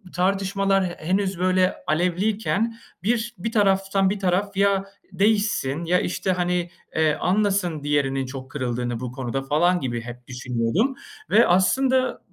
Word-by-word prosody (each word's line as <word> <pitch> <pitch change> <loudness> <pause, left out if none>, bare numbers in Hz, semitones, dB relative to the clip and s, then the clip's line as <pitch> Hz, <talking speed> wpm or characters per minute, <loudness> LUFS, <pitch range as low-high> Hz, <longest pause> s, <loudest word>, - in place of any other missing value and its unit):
tartışmalar 195 +1 +1
he 175 -1 -5
henüz 190 -1 0
böyle 185 0 +2
alevliyken 200 +7 0 0.3
bir 235 +2 0
bir 220 +6 -3
taraftan 195 -2 +2
bir 205 +1 -2
taraf 190 +1 0
ya 200 -1 +3 0.3
değişsin, 195 -7 +1
ya, 180 +2 +3
işte, 185 +1 -1
hani, 180 -1 0 0.3
eee, 155 -1 +3
anlasın 185 -4 0
diğerinin 135 -2 0
çok 130 0 -8
kırıldığını 120 -3 -2
bu 125 -1 -5
konuda 130 0 -3
falan 175 +6 +2
gibi 120 -5 -3
hep 120 +1 -10
düşünüyordum 125 - -1 0.3
ve 230 +2 +5
aslında 255 +9 +2
180 Hz, 135 wpm, -23 LUFS, 145-200 Hz, 0.3 s, ve